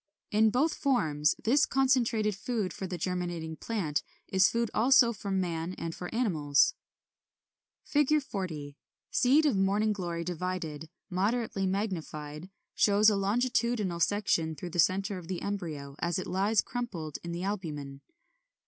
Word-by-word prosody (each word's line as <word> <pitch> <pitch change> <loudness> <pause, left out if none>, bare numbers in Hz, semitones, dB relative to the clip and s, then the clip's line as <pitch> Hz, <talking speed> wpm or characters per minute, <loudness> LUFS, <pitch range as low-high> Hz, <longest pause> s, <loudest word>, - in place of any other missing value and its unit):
In 220 +1 +4
both 275 +8 +2
forms 160 - +1
this 280 +7 +4
concentrated 235 -6 +2
food 210 -2 -2
for 190 - -5
the 180 -1 -4
germinating 175 -2 -3
plant 165 -8 -2 0.3
is 190 +1 +4
food 235 -1 -1
also 245 +1 +5
for 200 -1 -7
man 180 -2 -1
and 165 0 -4
for 180 - -6
animals. 160 - +2 1.2
[Illustration: 295 0 +5
Fig. 295 - -1
40. 155 - -5 0.3
Seed 280 +5 +4
of 285 - +3
Morning 200 +3 +2
Glory 170 -4 -3
divided, 165 -3 -4 0.2
moderately 200 +1 0
magnified; 170 -5 -4 0.2
shows 210 +1 +5
a - - +1
longitudinal 215 -2 0
section 170 -4 +1
through 175 +4 -7
the 175 - -3
centre 195 +3 +2
of 170 - -12
the 185 -1 -4
embryo 160 -9 -4
as 170 -1 0
it 185 - -3
lies 200 +4 +2
crumpled 190 - -5
in 170 - -5
the 170 +1 -4
albumen. 150 -9 -4
190 Hz, 145 wpm, -30 LUFS, 165-220 Hz, 1.2 s, also